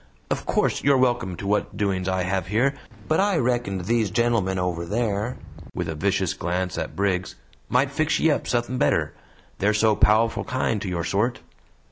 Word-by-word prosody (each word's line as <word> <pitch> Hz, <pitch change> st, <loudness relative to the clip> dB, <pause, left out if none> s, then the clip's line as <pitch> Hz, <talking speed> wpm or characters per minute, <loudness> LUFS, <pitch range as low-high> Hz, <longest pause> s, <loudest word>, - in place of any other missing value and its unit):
"Of -, -, -2 dB
course, -, -, +1 dB
you're 140 Hz, -1 st, +5 dB
welcome 120 Hz, -8 st, +1 dB
to 100 Hz, -, -8 dB
what 105 Hz, +1 st, 0 dB
doings 95 Hz, -2 st, 0 dB
I 95 Hz, -1 st, 0 dB
hev 95 Hz, 0 st, -1 dB
here, 120 Hz, +8 st, +2 dB, 0.3 s
but 155 Hz, -, +2 dB
I 200 Hz, -2 st, +2 dB
reckoned 120 Hz, -, 0 dB
these 110 Hz, +2 st, +1 dB
gentlemen 110 Hz, -3 st, +1 dB
over 90 Hz, -2 st, -1 dB
there," 105 Hz, +4 st, -1 dB, 0.4 s
with -, -, -2 dB
a 80 Hz, -, -2 dB
vicious 95 Hz, +2 st, 0 dB
glance 90 Hz, +1 st, -2 dB
at -, -, -4 dB
Briggs, 95 Hz, -2 st, -1 dB, 0.3 s
"might 135 Hz, +2 st, +2 dB
fix 155 Hz, +2 st, +1 dB
ye 160 Hz, -, +4 dB
up -, -, -1 dB
suthin' 120 Hz, +1 st, -1 dB
better; -, -, +1 dB, 0.5 s
they're 105 Hz, +2 st, +2 dB
so 110 Hz, 0 st, +3 dB
pow'ful 110 Hz, +3 st, +3 dB
kind 120 Hz, -5 st, -1 dB
to 100 Hz, -, -3 dB
your 85 Hz, -2 st, -2 dB
sort." 105 Hz, +8 st, 0 dB
105 Hz, 180 wpm, -24 LUFS, 95-120 Hz, 0.5 s, you're